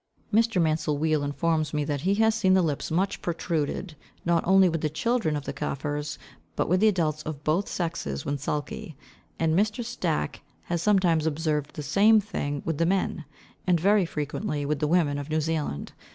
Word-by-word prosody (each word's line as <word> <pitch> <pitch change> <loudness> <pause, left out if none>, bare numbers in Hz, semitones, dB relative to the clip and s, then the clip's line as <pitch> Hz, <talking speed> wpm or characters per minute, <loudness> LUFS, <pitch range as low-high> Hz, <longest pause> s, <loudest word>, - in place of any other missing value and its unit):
Mr. 225 -2 +3
Mansel 155 -2 +1
Weale 155 -1 +1
informs 155 +1 0
me 150 - +1
that 145 -2 -2
he 195 +5 +2
has 220 +1 +3
seen 190 -4 +3
the 185 - +4
lips 150 -4 -2
much 185 +5 0
protruded, 165 0 -2 0.3
not 170 -1 +3
only 190 0 +6
with 165 -2 -1
the 155 - 0
children 160 +1 0
of 145 -2 -4
the - - -4
Kafirs, 145 +1 -3 0.4
but - - 0
with 180 +2 +3
the 220 - +5
adults 160 -7 +1
of 150 -2 -6
both 170 +6 +1
sexes 165 - -3
when 140 0 -2
sulky; 145 +1 -4 0.4
and 160 -1 +1
Mr. 215 +6 +1
Stack 75 - -2 0.2
has 170 -1 -2
sometimes 175 -6 +3
observed 150 -2 -1
the 150 - -5
same 205 +10 +5
thing 145 -9 -3
with 165 -3 -2
the 165 - +3
men, 185 -3 0 0.4
and 175 -2 +4
very 200 +1 +3
frequently 150 +1 -3
with 150 0 -1
the 150 - +1
women 150 -4 +2
of 145 +1 -7
New 155 0 +1
Zealand. 155 - -2
160 Hz, 190 wpm, -26 LUFS, 150-185 Hz, 0.4 s, only